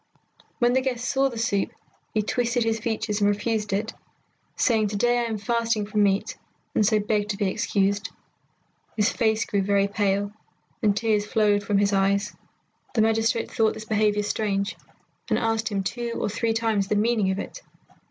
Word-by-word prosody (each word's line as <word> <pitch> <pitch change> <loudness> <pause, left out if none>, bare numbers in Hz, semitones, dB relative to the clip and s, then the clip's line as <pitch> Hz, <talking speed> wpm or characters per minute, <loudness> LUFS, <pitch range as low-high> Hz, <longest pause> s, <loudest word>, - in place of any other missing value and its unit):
When 240 -2 +3
the 260 - +3
guest 250 -2 -2
saw 270 0 +2
the 240 - -8
soup 210 -3 0 0.4
he 215 - 0
twisted 240 +2 0
his 225 0 0
features 215 -1 -2
and 205 - +4
refused 210 0 -1
it, 210 +3 -1 0.6
saying, 220 -3 +2
"To 205 - -4
day 240 +4 +2
I 240 - 0
am 225 -2 -2
fasting 230 -1 0
from 210 0 0
meat, 200 -1 +1 0.4
and - - +3
so 215 +1 +3
beg 210 -1 0
to 200 - -2
be 205 - 0
excused." 200 +1 0 0.9
His 210 0 +3
face 220 -1 +1
grew 200 - 0
very 200 0 +2
pale, 200 0 0 0.5
and 205 -2 +2
tears 210 -2 +1
flowed 210 -2 +2
from 205 0 0
his 200 0 +2
eyes. 200 +1 +1 0.6
The 220 - +4
magistrate 225 +1 +1
thought 220 -1 +2
this 215 - -8
behaviour 210 -1 +1
strange, 205 -1 -1 0.5
and - - +2
asked 225 -1 0
him 200 -2 -1
two 235 +3 -3
or - - -1
three 225 +2 0
times 225 -3 0
the 210 - 0
meaning 215 -2 +2
of 190 - -1
it. - - -6
215 Hz, 180 wpm, -25 LUFS, 205-225 Hz, 0.9 s, and